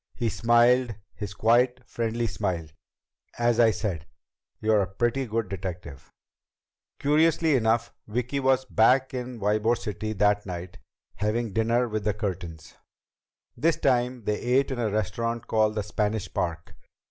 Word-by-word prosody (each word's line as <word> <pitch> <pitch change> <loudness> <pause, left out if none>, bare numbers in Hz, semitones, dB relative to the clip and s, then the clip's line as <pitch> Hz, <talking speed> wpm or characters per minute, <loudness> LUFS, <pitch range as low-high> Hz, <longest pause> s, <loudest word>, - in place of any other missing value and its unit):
He 120 -3 -1
smiled 120 +1 +3 0.2
his 100 -2 -7
quiet, 120 +4 +3
friendly 115 0 -2
smile. 95 -7 -2 0.7
"As 120 0 +2
I 115 -1 +6
said, 90 -8 -3 0.5
you're 110 -1 +3
a 95 - -1
pretty 120 +6 0
good 115 0 -1
detective." 90 -7 -7 0.9
Curiously 160 +1 +3
enough, 115 -1 +1
Vicki 125 +5 -2
was 130 -1 +2
back 130 +3 +3
in 125 -1 -5
Ybor 110 +3 +1
City 110 -1 -4
that 105 0 +2
night, 90 0 -7 0.4
having 110 +1 -1
dinner 115 +3 +2
with 110 -2 -3
the 105 -1 0
Curtins. 90 -6 -5 0.8
This 165 +1 +1
time 125 -2 +1
they 105 +1 -1
ate 130 +3 +1
in 130 - -3
a 115 -2 0
restaurant 110 +3 -2
called 110 -1 +1
the 105 - -1
Spanish 105 0 -2
Park. 85 -1 -3
115 Hz, 140 wpm, -26 LUFS, 105-120 Hz, 0.9 s, I